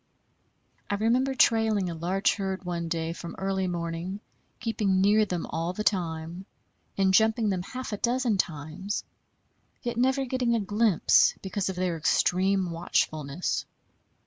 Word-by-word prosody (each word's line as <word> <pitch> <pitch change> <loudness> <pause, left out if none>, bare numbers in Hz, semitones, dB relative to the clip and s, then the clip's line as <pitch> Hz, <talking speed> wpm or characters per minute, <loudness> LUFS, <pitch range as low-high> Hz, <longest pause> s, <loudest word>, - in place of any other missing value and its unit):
I 205 - +1
remember 245 +6 +1
trailing 220 -6 +3
a - - -4
large 180 +4 +1
herd 195 -1 -3
one 170 -1 -3
day 165 0 -2
from 170 0 -8
early 190 -1 -1
morning, 170 +2 -4 0.4
keeping 210 -4 0
near 210 +3 +4
them 180 -4 -3
all 165 +2 -2
the 215 - -3
time, 170 -1 -2 0.5
and 190 -1 +3
jumping 220 +1 +3
them 185 -2 -1
half 255 +5 -6
a - - -2
dozen 240 -1 +1
times, 160 +5 -3 0.8
yet 240 -2 -3
never 265 +2 +2
getting 245 -2 0
a - - +1
glimpse 205 -2 +3
because 195 0 -2
of 190 - -3
their 180 -2 -1
extreme 185 +3 +2
watchfulness. 155 -2 -1
190 Hz, 145 wpm, -27 LUFS, 175-220 Hz, 0.8 s, near